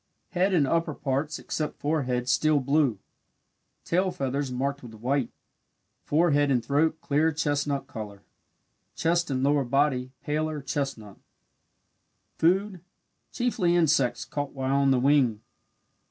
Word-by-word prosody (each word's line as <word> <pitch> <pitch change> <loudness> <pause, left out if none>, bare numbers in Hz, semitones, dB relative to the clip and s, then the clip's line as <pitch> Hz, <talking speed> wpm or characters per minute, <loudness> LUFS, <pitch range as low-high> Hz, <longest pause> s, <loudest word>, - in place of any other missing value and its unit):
Head 185 +2 +1
and 150 -5 +4
upper 165 +1 0
parts 145 +3 -2
except 155 -1 -4
forehead 130 -5 -1
steel 150 +4 +3
blue 140 -3 +2 0.9
tail 185 +3 +1
feathers 140 -4 -2
marked 140 +3 -2
with 115 -3 -11
white 125 +3 -1 0.8
forehead 145 -2 +3
and 125 -4 +1
throat 155 +4 +1
clear 155 +3 +2
chestnut 145 -2 -1
colour 105 -7 -8 0.7
chest 170 +1 +1
and 130 -1 -1
lower 145 0 +3
body 130 0 +1
paler 155 +1 -1
chestnut. 135 -8 -4 1.2
Food 185 +2 +2 0.5
chiefly 210 -9 +1
insects 150 -7 +2
caught 145 -1 -4
while 135 0 0
on 140 -1 +3
the 130 -2 +3
wing. 130 -5 +3
145 Hz, 125 wpm, -27 LUFS, 130-155 Hz, 1.2 s, and